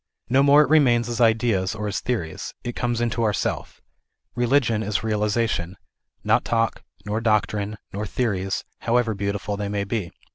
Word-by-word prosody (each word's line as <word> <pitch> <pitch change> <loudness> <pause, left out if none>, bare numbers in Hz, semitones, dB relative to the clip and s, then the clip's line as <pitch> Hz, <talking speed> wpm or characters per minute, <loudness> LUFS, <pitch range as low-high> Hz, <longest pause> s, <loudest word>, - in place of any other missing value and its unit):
No 130 +2 +4
more 145 +2 +7
it 140 - -3
remains 120 -7 +4
as 120 +1 -2
ideas 110 -4 +2
or 105 -1 -3
as 105 - -2
theories; 100 -11 -4
it 120 -1 -4
comes 120 -1 -1
into 120 0 0
our 110 -2 +2
Self. - - -3 0.5
Religion 120 -2 +2
is 105 0 -1
realization, 105 -4 0 0.5
not - - +3
talk, 115 -1 0 0.2
nor 105 +2 -2
[doctrine, 105 -1 0 0.2
nor 105 +2 -3
theories, 95 -5 -1 0.2
however 115 -1 +1
beautiful 100 +1 -3
they 100 -1 -3
may 100 -1 -1
be. 100 -3 -3
110 Hz, 160 wpm, -23 LUFS, 100-120 Hz, 0.5 s, more